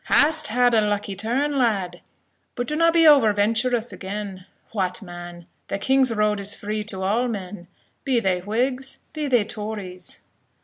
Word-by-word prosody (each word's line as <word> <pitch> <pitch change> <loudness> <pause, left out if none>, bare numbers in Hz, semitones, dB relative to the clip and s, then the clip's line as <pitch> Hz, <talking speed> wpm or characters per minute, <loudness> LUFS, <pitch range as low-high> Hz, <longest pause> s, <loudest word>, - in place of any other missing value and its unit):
"Hast 310 +1 +4
had 245 +1 +3
a 220 - +5
lucky 205 -1 -1
turn, 265 +8 -1
lad; 195 -7 0 0.5
but 245 -1 -3
do 300 - -2
na 330 +1 +4
be 330 0 +4
over 280 -8 +7
venturous 230 +3 +1
again. 195 -1 -6 0.2
What, 190 0 -2
man! 175 -1 -9 0.2
the 195 - -2
king's 260 +4 +3
road 210 -1 +1
is 200 +1 -3
free 210 +1 -3
to 190 -3 -4
all 225 +6 +1
men, 190 -5 -6 0.4
be 260 -3 +2
they 190 -4 0
Whigs, 250 +7 -1 0.2
be 305 -2 -3
they 245 -6 +3
Tories." 205 -5 -6
215 Hz, 165 wpm, -23 LUFS, 195-250 Hz, 0.5 s, over